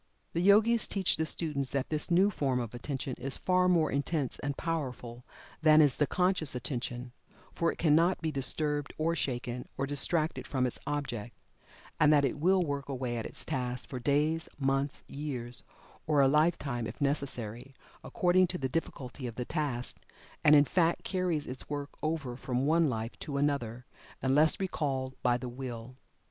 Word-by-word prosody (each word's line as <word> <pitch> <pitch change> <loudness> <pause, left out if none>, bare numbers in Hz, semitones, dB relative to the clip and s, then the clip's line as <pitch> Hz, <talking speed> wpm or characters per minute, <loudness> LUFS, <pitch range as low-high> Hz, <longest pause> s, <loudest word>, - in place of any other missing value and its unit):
The 170 - 0
Yogis 215 +4 +5
teach 195 -3 +1
the 160 0 0
students 150 -5 -1
that 135 -2 -2
this 150 -1 0
new 185 +4 +4
form 135 -8 0
of 120 -2 -4
Attention 130 +1 -4
is 135 +1 -2
far 180 0 +2
more 165 -3 +3
intense 140 -1 -1
and 140 -1 -3
powerful 125 -7 -4 0.4
than 155 -1 +7
is 145 -4 +4
the 150 - +2
conscious 180 -6 +1
Attention, 125 0 -4 0.4
for 170 0 +1
it - - -10
cannot 165 +3 +3
be 160 -1 -2
disturbed 145 +1 -1
or 165 +2 +1
shaken, 125 -3 -3
or 135 - 0
distracted 145 -1 +1
from 130 -1 0
its 125 - -2
object, 120 -6 -3 0.6
and 150 0 +6
that 145 -2 +5
it 135 +2 -2
will 185 +3 +3
work 140 -1 -3
away 130 -3 -2
at 115 - -3
its - - -10
task 125 -4 -3
for 130 - -4
days, 150 +5 +1
months, 135 0 0
years, 125 -5 -5 0.4
or 150 -2 +3
a 135 - +6
lifetime 145 -5 +1
if 115 - -8
necessary, 135 -3 -2 0.3
according 185 -3 +3
to 180 - -3
the 135 - -1
difficulty 130 -3 -4
of 115 - -7
the 125 - -3
task, 140 -6 -3 0.5
and 150 - +7
in 145 0 +7
fact 170 +2 +1
carries 180 -5 -1
its 130 +1 -7
work 145 -1 -4
over 155 -6 -2
from 125 +1 -2
one 160 +1 +3
life 115 -1 -4
to 140 -2 -4
another, 130 -4 -1 0.4
unless 145 +4 +4
recalled 135 -8 -2
by 120 -1 +3
the 125 - -6
Will. 125 -1 -7
140 Hz, 175 wpm, -31 LUFS, 125-160 Hz, 0.6 s, than